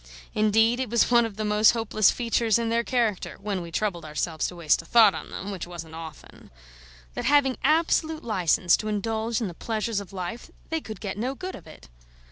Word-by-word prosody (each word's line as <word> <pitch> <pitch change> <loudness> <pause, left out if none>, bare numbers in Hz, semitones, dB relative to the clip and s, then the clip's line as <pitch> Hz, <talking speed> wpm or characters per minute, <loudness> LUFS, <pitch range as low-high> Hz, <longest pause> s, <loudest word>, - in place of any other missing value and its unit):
Indeed, 225 +3 +3
it 260 -3 -2
was 235 +1 +2
one 235 -1 +5
of 210 -2 -12
the 215 - -2
most 210 +1 +5
hopeless 215 -2 +3
features 230 -2 +1
in 230 -1 -1
their 230 +1 +1
character 230 -6 -1
(when 200 -2 -3
we 170 - -7
troubled 180 -2 -2
ourselves 155 +1 -2
to 180 - -8
waste 165 -3 +2
a - - -18
thought 220 0 +6
on - - -7
them: 200 - -6
which 185 -3 -6
wasn't 165 -2 -9
often) 160 -2 -11 0.6
that, - - -4
having 280 -3 +4
absolute 315 +1 +2
licence 180 -5 +2
to 215 - -5
indulge 220 +2 -1
in 220 - -1
the 175 - -7
pleasures 220 +3 -2
of 200 -3 -10
life, 190 +5 -6 0.2
they 320 0 -1
could 215 -7 -9
get 200 -1 -5
no 255 +4 -2
good 370 +6 -6
of - - -11
it. - - -14
215 Hz, 210 wpm, -25 LUFS, 185-235 Hz, 0.6 s, thought